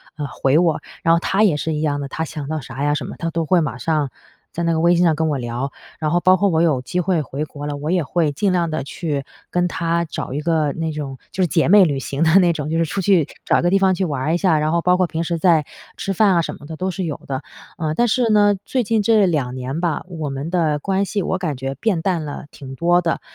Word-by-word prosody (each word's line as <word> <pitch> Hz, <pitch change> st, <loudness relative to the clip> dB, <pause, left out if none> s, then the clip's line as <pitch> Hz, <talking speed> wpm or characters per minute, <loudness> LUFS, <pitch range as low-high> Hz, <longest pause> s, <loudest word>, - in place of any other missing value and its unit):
呃， 145 Hz, -2 st, -4 dB
回 135 Hz, +4 st, +2 dB
我， 170 Hz, -3 st, +2 dB, 0.2 s
然 165 Hz, 0 st, +4 dB
后 170 Hz, -, +2 dB
她 195 Hz, +4 st, 0 dB
也 180 Hz, -9 st, +4 dB
是 160 Hz, +1 st, -2 dB
一 150 Hz, -, -2 dB
样 145 Hz, -2 st, 0 dB
的， 140 Hz, -, -4 dB
她 160 Hz, +3 st, -4 dB
想 150 Hz, -3 st, -6 dB
到 155 Hz, +1 st, -2 dB
啥 130 Hz, +2 st, -6 dB
呀 145 Hz, 0 st, +2 dB
什 150 Hz, -, -2 dB
么 -, -, -7 dB
她 165 Hz, -1 st, -3 dB
都 165 Hz, 0 st, -1 dB
会 180 Hz, +1 st, +4 dB
马 135 Hz, -6 st, -3 dB
上 150 Hz, 0 st, 0 dB, 0.4 s
在 170 Hz, -, -3 dB
那 170 Hz, 0 st, +2 dB
个 160 Hz, -, 0 dB
微 175 Hz, +1 st, +4 dB
信 175 Hz, -, +3 dB
上 160 Hz, -, +3 dB
跟 160 Hz, +1 st, 0 dB
我 145 Hz, -, 0 dB
聊， 120 Hz, +2 st, -3 dB, 0.3 s
然 155 Hz, -1 st, -1 dB
后 175 Hz, -, +3 dB
包 185 Hz, +1 st, +5 dB
括 200 Hz, +1 st, +2 dB
我 160 Hz, -1 st, +2 dB
有 150 Hz, -7 st, +2 dB
机 175 Hz, +8 st, -3 dB
会 175 Hz, -2 st, +1 dB
回 145 Hz, +2 st, -4 dB
国 145 Hz, -1 st, -7 dB
了， 145 Hz, -1 st, -3 dB
我 150 Hz, +2 st, -4 dB
也 180 Hz, -2 st, +2 dB
会 155 Hz, 0 st, 0 dB
尽 195 Hz, +7 st, +1 dB
量 175 Hz, -2 st, +1 dB
地 155 Hz, -2 st, -2 dB
去 145 Hz, -1 st, -3 dB, 0.3 s
跟 175 Hz, 0 st, +1 dB
她 170 Hz, 0 st, 0 dB
找 155 Hz, -, -5 dB
一 145 Hz, -, -2 dB
个 155 Hz, -3 st, +1 dB
那 165 Hz, -1 st, -3 dB
种 140 Hz, -3 st, -5 dB
就 190 Hz, -, -2 dB
是 180 Hz, -, +3 dB
姐 165 Hz, 0 st, +1 dB
妹 200 Hz, -2 st, +8 dB
旅 140 Hz, -4 st, -1 dB
行 140 Hz, +2 st, -4 dB
的 165 Hz, +2 st, +4 dB
那 175 Hz, -, +4 dB
种， 150 Hz, -2 st, -4 dB
就 165 Hz, -, 0 dB
是 165 Hz, -, +3 dB
出 180 Hz, +5 st, -3 dB
去 185 Hz, -4 st, +3 dB, 0.2 s
找 -, -, +3 dB
一 -, -, 0 dB
个 175 Hz, -, +2 dB
地 195 Hz, -, +3 dB
方 190 Hz, -1 st, +3 dB
去 190 Hz, -, -1 dB
玩 145 Hz, -7 st, -2 dB
儿 155 Hz, +5 st, 0 dB
一 175 Hz, -, +2 dB
下， 170 Hz, -5 st, +2 dB
然 155 Hz, +2 st, 0 dB
后 170 Hz, -, +2 dB
包 180 Hz, +1 st, +3 dB
括 185 Hz, -1 st, +2 dB
平 165 Hz, 0 st, -3 dB
时 170 Hz, 0 st, -2 dB
在 165 Hz, -4 st, +4 dB, 0.3 s
吃 195 Hz, -, -3 dB
饭 195 Hz, 0 st, +3 dB
啊 170 Hz, -, +4 dB
什 -, -, -4 dB
么 145 Hz, -, -12 dB
的 160 Hz, +2 st, -7 dB
都 185 Hz, +3 st, -2 dB
是 185 Hz, -1 st, -3 dB
有 150 Hz, -, -3 dB
的。 135 Hz, -1 st, -3 dB, 0.4 s
呃， 155 Hz, -3 st, -1 dB
但 240 Hz, -1 st, +2 dB
是 245 Hz, 0 st, +2 dB
呢， 205 Hz, -1 st, +5 dB
最 255 Hz, -2 st, 0 dB
近 220 Hz, 0 st, +1 dB
这 215 Hz, -1 st, +4 dB
2 140 Hz, -8 st, -1 dB
年 130 Hz, +4 st, -4 dB
吧， 170 Hz, -3 st, -1 dB
我 160 Hz, -4 st, -4 dB
们 135 Hz, +3 st, -4 dB
的 160 Hz, -4 st, +1 dB
关 195 Hz, +5 st, 0 dB
系 200 Hz, -1 st, -2 dB
我 185 Hz, -, -1 dB
感 160 Hz, -6 st, -2 dB
觉 135 Hz, +1 st, -4 dB
变 195 Hz, -4 st, 0 dB
淡 170 Hz, -3 st, -1 dB
了 145 Hz, 0 st, -6 dB
挺 135 Hz, -1 st, -9 dB
多 175 Hz, +5 st, +3 dB
的， 170 Hz, -1 st, -1 dB
165 Hz, 310 characters per minute, -20 LUFS, 145-180 Hz, 0.4 s, 妹